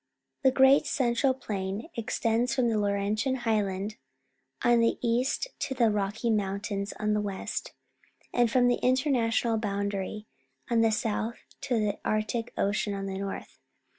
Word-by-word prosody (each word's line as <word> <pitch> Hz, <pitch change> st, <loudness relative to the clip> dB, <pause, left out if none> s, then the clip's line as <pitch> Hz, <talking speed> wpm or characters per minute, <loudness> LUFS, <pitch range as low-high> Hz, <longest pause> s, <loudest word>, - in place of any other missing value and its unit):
The 265 Hz, -, +5 dB
Great 265 Hz, +1 st, +5 dB
Central 260 Hz, -1 st, +2 dB
Plain 200 Hz, -2 st, -4 dB
extends 230 Hz, +1 st, 0 dB
from 240 Hz, -2 st, +2 dB
the 220 Hz, -, +1 dB
Laurentian 205 Hz, +5 st, 0 dB
Highland 210 Hz, -1 st, 0 dB, 0.7 s
on 240 Hz, -1 st, +5 dB
the 230 Hz, 0 st, +2 dB
east 250 Hz, -, 0 dB
to 265 Hz, -, -2 dB
the 235 Hz, -3 st, +3 dB
Rocky 210 Hz, +3 st, -1 dB
Mountains 200 Hz, 0 st, -1 dB
on 210 Hz, 0 st, +1 dB
the 210 Hz, -, +1 dB
west, 200 Hz, -2 st, -4 dB, 0.6 s
and 240 Hz, -1 st, +3 dB
from 245 Hz, +1 st, +4 dB
the 245 Hz, -, +2 dB
international 245 Hz, -4 st, +2 dB
boundary 200 Hz, 0 st, -3 dB, 0.5 s
on 230 Hz, -1 st, +4 dB
the 225 Hz, -1 st, +4 dB
south 220 Hz, +1 st, -2 dB, 0.2 s
to 250 Hz, -4 st, 0 dB
the 210 Hz, -1 st, -1 dB
Arctic 215 Hz, +2 st, -1 dB
Ocean 205 Hz, 0 st, 0 dB
on 195 Hz, 0 st, -4 dB
the 190 Hz, 0 st, -4 dB
north. 195 Hz, 0 st, -6 dB
225 Hz, 145 wpm, -28 LUFS, 205-240 Hz, 0.7 s, The